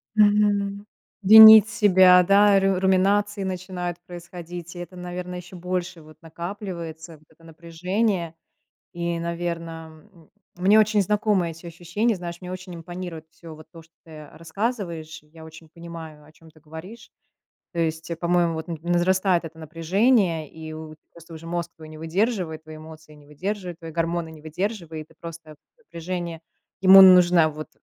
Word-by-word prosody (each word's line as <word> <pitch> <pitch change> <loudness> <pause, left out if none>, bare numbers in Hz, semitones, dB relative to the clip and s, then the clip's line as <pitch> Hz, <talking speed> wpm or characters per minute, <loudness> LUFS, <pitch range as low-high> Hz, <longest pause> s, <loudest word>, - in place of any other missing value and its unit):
Мгм. 205 -1 +2 0.4
Винить 220 +1 +10
себя, 190 -3 +5
да, 200 +1 +4
ру 195 -1 +1
руминации 195 +2 +1
начинают 180 -2 -5
происходить. 175 0 -10
И - - -8
это, 175 +1 -9
наверно, 180 0 -7
еще 180 +1 -10
больше 180 -1 -4
вот 155 0 -17
накапливается, 170 -1 -8
вот 155 - -26
это 165 +1 -25
напряжение. 170 +2 -3 0.6
И, 170 0 -3
наверно, 165 0 -6
м, 165 -4 -22 0.3
мне 195 +4 +4
очень 215 -1 +3
знакомы 205 -3 0
эти 165 +2 -12
ощущения, 175 +7 -2
знаешь, 175 -1 -8
мне 180 0 -8
очень 185 -1 -8
импонирует 170 -1 -8
всё 165 -2 -13
вот 155 0 -15
то, 165 -2 -13
что 165 0 -27
ты, 165 - -17
э, 155 0 -13
рассказываешь. 165 -3 -5
И - - -28
я 160 +1 -15
очень 160 0 -14
понимаю, 165 -3 -11
о 155 - -19
чём 160 0 -20
ты 155 - -23
говоришь. 170 +10 -12 0.6
То 170 - -7
есть, 160 0 -3
э, 165 - -3
по-моему, 170 -1 0
вот 160 +2 -6
на 165 - -4
возрастает 175 +1 +1
это 165 0 -10
напряжение, 165 - 0
и 160 -1 -10
у 155 0 -9 0.2
просто 165 0 -14
уже 160 +1 -11
мозг 170 0 -4
твой 155 -1 -13
не 155 0 -12
выдерживает, 170 -1 -2
твои 155 0 -11
эмоции 155 0 -14
не 145 -1 -19
выдерживают, 180 +3 -6
твои 165 -2 -9
гормоны 165 0 -2
не 155 -1 -14
выдерживают, 165 -2 -5
и - - -21
просто 165 -2 -10 0.2
напряжение. 170 - -6 0.4
Ему 190 0 +9
нужно 180 -3 +6
вот 155 0 -8
170 Hz, 165 wpm, -23 LUFS, 160-190 Hz, 0.6 s, Винить